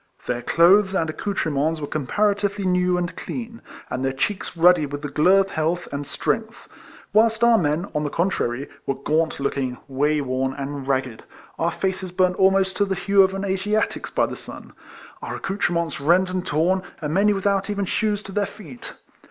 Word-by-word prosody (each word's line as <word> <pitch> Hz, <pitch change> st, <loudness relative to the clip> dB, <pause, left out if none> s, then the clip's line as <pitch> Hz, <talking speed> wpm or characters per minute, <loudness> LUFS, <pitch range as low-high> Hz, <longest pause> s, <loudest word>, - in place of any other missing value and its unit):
Their 120 Hz, 0 st, -2 dB
clothes 190 Hz, +7 st, +4 dB
and 160 Hz, -4 st, 0 dB
accoutrements 160 Hz, -4 st, -1 dB
were 145 Hz, -, -3 dB
com 145 Hz, -2 st, -4 dB
paratively 205 Hz, 0 st, 0 dB
new 180 Hz, 0 st, +2 dB
and 180 Hz, 0 st, -3 dB
clean, 230 Hz, -2 st, -6 dB, 0.3 s
and 130 Hz, -, -4 dB
their 135 Hz, -, +1 dB
cheeks 185 Hz, +6 st, -3 dB
ruddy 170 Hz, -2 st, +5 dB
with 145 Hz, +1 st, -6 dB
the 145 Hz, -, -3 dB
glow 180 Hz, +7 st, +4 dB
of 195 Hz, 0 st, -4 dB
health 165 Hz, +3 st, -1 dB
and 140 Hz, 0 st, -4 dB
strength; 225 Hz, +9 st, -3 dB, 0.5 s
whilst 225 Hz, +1 st, +3 dB
our 235 Hz, -1 st, +6 dB
men, 155 Hz, +2 st, 0 dB
on 150 Hz, -, -1 dB
the 145 Hz, -, -1 dB
con 175 Hz, +6 st, 0 dB
trary, 120 Hz, -2 st, -2 dB, 0.2 s
were 135 Hz, -, 0 dB
gaunt 160 Hz, +2 st, 0 dB
looking, 135 Hz, -2 st, -2 dB
way 145 Hz, +3 st, +1 dB
worn, 130 Hz, -1 st, -1 dB
and 140 Hz, -1 st, -5 dB
ragged; 130 Hz, -4 st, -1 dB, 0.4 s
our -, -, +2 dB
faces 190 Hz, -1 st, -2 dB
burnt 185 Hz, 0 st, +1 dB
almost 190 Hz, 0 st, +3 dB
to 205 Hz, -, +3 dB
the 195 Hz, -1 st, -2 dB
hue 195 Hz, +1 st, +3 dB
of 190 Hz, 0 st, +3 dB
an 195 Hz, +1 st, -3 dB
Asiatic's 200 Hz, +3 st, -1 dB
by -, -, +1 dB
the -, -, -6 dB
sun; -, -, -10 dB, 0.5 s
our -, -, -5 dB
accoutre 195 Hz, -1 st, -1 dB
ments 170 Hz, -4 st, -2 dB
rent 180 Hz, +5 st, +3 dB
and 185 Hz, 0 st, -3 dB
torn; 175 Hz, +5 st, +1 dB, 0.2 s
and 150 Hz, -2 st, -3 dB
many 200 Hz, +4 st, +4 dB
without 195 Hz, 0 st, 0 dB
even 200 Hz, -1 st, -1 dB
shoes 210 Hz, +1 st, -1 dB
to 195 Hz, -, -9 dB
their 205 Hz, 0 st, 0 dB
feet. 150 Hz, -, -11 dB
180 Hz, 195 wpm, -23 LUFS, 145-195 Hz, 0.5 s, our